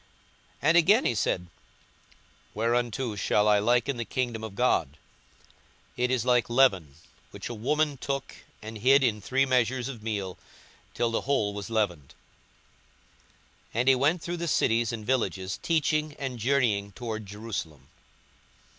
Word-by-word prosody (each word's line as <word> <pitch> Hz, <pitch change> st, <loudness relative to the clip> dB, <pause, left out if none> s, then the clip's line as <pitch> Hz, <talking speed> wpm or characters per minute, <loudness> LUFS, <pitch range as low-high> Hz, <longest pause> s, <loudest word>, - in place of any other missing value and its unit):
42:013:020 -, -, -33 dB, 0.6 s
And 165 Hz, -, +5 dB
again 200 Hz, +8 st, +5 dB
he -, -, +2 dB
said, 90 Hz, -4 st, -1 dB, 1.1 s
Whereunto 120 Hz, +1 st, -1 dB
shall 105 Hz, +1 st, +2 dB
I 105 Hz, -1 st, +5 dB
liken 120 Hz, +4 st, +1 dB
the 120 Hz, -, -2 dB
kingdom 115 Hz, 0 st, -3 dB
of 110 Hz, -3 st, -7 dB
God? 80 Hz, -, +1 dB, 1.0 s
42:013:021 -, -, -29 dB
It 125 Hz, 0 st, +1 dB
is 125 Hz, -2 st, 0 dB
like 125 Hz, -2 st, +2 dB
leaven, 95 Hz, -, +3 dB, 0.3 s
which -, -, -8 dB
a -, -, -4 dB
woman 145 Hz, +6 st, 0 dB
took 135 Hz, +1 st, -4 dB, 0.3 s
and 110 Hz, 0 st, -7 dB
hid 135 Hz, +5 st, +5 dB
in 110 Hz, -4 st, +1 dB
three 135 Hz, +6 st, +1 dB
measures 125 Hz, -1 st, +1 dB
of 120 Hz, -5 st, -8 dB
meal, 100 Hz, -4 st, -4 dB, 0.6 s
till 120 Hz, -1 st, 0 dB
the 115 Hz, -, 0 dB
whole 120 Hz, -7 st, 0 dB
was 100 Hz, +2 st, -6 dB
leavened. 90 Hz, -11 st, -2 dB, 1.6 s
42:013:022 -, -, 0 dB
And 125 Hz, +2 st, +3 dB
he -, -, +7 dB
went 150 Hz, +7 st, +1 dB
through 175 Hz, +1 st, -3 dB
the 170 Hz, 0 st, -3 dB
cities 115 Hz, -6 st, +2 dB
and 110 Hz, -2 st, -6 dB
villages, 100 Hz, -7 st, -1 dB
teaching, 155 Hz, -2 st, 0 dB
and 130 Hz, -3 st, -5 dB
journeying 110 Hz, -5 st, +1 dB
toward 110 Hz, -1 st, -5 dB
Jerusalem. 100 Hz, -8 st, -6 dB
120 Hz, 155 wpm, -27 LUFS, 105-135 Hz, 1.6 s, he